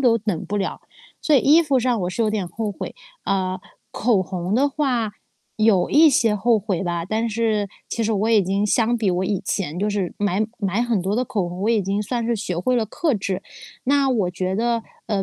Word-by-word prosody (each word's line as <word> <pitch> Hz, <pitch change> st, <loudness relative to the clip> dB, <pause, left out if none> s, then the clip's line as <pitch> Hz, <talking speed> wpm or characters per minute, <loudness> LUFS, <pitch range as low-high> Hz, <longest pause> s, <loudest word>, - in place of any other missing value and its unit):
都 240 Hz, -3 st, +4 dB
等 210 Hz, -6 st, -3 dB
不 205 Hz, -, -2 dB
了， 195 Hz, -, -2 dB, 0.4 s
所 305 Hz, -, +3 dB
以 -, -, +7 dB
衣 315 Hz, +6 st, +6 dB
服 280 Hz, -4 st, +2 dB
上 245 Hz, -2 st, +1 dB
我 180 Hz, 0 st, -1 dB
是 235 Hz, -, -4 dB
有 220 Hz, -, +2 dB
点 200 Hz, -5 st, -2 dB
后 210 Hz, +3 st, -3 dB
悔。 -, -, -7 dB, 0.3 s
啊， 185 Hz, -1 st, -1 dB, 0.3 s
口 220 Hz, -2 st, +2 dB
红 180 Hz, 0 st, -4 dB
的 280 Hz, +3 st, +3 dB
话， 255 Hz, -7 st, -1 dB, 0.4 s
有 215 Hz, -4 st, +3 dB
一 310 Hz, +1 st, +6 dB
些 230 Hz, -4 st, +3 dB
后 220 Hz, +2 st, +2 dB
悔 195 Hz, -4 st, -2 dB
吧， 170 Hz, -2 st, -2 dB
但 220 Hz, +5 st, -1 dB
是 215 Hz, -2 st, 0 dB, 0.2 s
其 230 Hz, -, -2 dB
实 225 Hz, 0 st, 0 dB
我 215 Hz, +2 st, 0 dB
已 215 Hz, -3 st, +5 dB
经 195 Hz, +3 st, 0 dB
相 230 Hz, +2 st, +2 dB
比 215 Hz, -4 st, 0 dB
我 180 Hz, +1 st, +1 dB
以 195 Hz, -1 st, -1 dB
前 175 Hz, -5 st, -2 dB
就 205 Hz, -, 0 dB
是 200 Hz, -4 st, -2 dB
买 205 Hz, +1 st, +1 dB
买 200 Hz, +2 st, 0 dB
很 235 Hz, -5 st, 0 dB
多 190 Hz, +3 st, -1 dB
的 250 Hz, +3 st, +1 dB
口 200 Hz, -7 st, -2 dB
红， 180 Hz, +2 st, -7 dB
我 215 Hz, -, +1 dB
已 225 Hz, -2 st, +3 dB
经 200 Hz, +2 st, -1 dB
算 235 Hz, +2 st, -2 dB
是 235 Hz, -, +1 dB
学 185 Hz, -5 st, -3 dB
会 255 Hz, +8 st, +1 dB
了 235 Hz, -2 st, +2 dB
克 290 Hz, -, -1 dB
制。 195 Hz, -2 st, -2 dB, 0.4 s
那 275 Hz, +1 st, +3 dB
我 215 Hz, -8 st, +1 dB
觉 185 Hz, +1 st, -2 dB
得， 230 Hz, +1 st, 0 dB, 0.2 s
呃， 200 Hz, -3 st, 0 dB
210 Hz, 245 characters per minute, -22 LUFS, 190-235 Hz, 0.4 s, 以